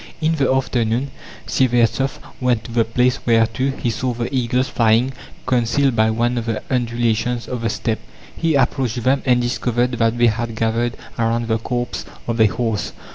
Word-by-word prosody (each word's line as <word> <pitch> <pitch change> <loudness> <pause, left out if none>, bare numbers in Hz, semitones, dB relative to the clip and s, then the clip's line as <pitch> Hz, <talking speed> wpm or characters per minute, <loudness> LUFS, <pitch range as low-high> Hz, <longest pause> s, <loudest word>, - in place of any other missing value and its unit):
In 160 0 +1
the 140 -5 +1
afternoon, 125 0 0 0.3
Syevertsoff 125 +1 +1 0.2
went 125 -3 +1
to 115 - -9
the 115 0 +3
place 125 +3 +1
whereto 115 +3 +2
he 135 -3 -2
saw 125 +2 -2
the 120 +3 -4
eagles 125 0 +1
flying; 115 +3 +2 0.3
concealed 125 +2 +2
by 110 -1 +3
one 120 +2 0
of 115 - -6
the 115 -2 -2
undulations 120 -1 0
of 125 -2 -4
the 115 - 0
Steppe, 110 0 -2 0.4
he 165 -2 +1
approached 125 -3 0
them, 135 +2 +2
and 125 -1 +4
discovered 120 0 0
that 115 0 +2
they 120 - +4
had 115 0 0
gathered 115 +2 0 0.2
around 115 0 0
the 110 -1 +1
corpse 120 +1 -3 0.2
of 115 -1 0
a 110 - +7
horse. 110 0 -2
120 Hz, 175 wpm, -20 LUFS, 115-125 Hz, 0.4 s, a